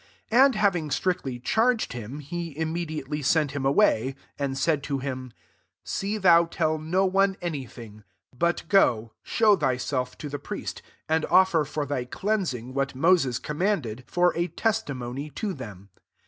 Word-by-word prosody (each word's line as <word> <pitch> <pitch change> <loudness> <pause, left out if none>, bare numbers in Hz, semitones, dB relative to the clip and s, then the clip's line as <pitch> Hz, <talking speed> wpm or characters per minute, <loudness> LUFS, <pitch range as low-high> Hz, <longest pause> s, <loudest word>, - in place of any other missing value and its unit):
43 235 - +3
And 275 -4 +2
having 180 -7 +1
strictly 145 -4 -1
charged 225 - +1
him, 120 +5 -7
he 165 +1 -6
immediately 155 -3 -3
sent 150 +1 +2
him 140 -1 -1
away; 135 - +3 0.2
44 - - -2
and 135 0 -4
said 150 +1 +1
to 140 0 -2
him, 130 -2 -5 0.3
" - - -46
See 205 +2 -2
thou 170 -4 +6
tell 155 -2 -1
no 180 +5 +1
one 195 +1 +2
any 150 -7 -4
thing: 110 -2 -12 0.3
but 170 +6 0
go, 115 - +3
show 215 -2 +3
thyself 130 -4 -1
to 150 - -6
the 145 0 -5
priest, - - -6 0.3
and 160 0 +1
offer 185 -3 +4
for 150 +1 -3
thy 130 -3 -2
cleansing 135 - -2
what 140 0 -1
Moses 140 -4 +3
commanded; 150 - -2
for 175 +3 +2
a 170 +1 0
tes 220 +3 0
timony 135 - -6
to 210 -3 -2
them." 100 - -10
150 Hz, 165 wpm, -26 LUFS, 130-180 Hz, 0.3 s, thou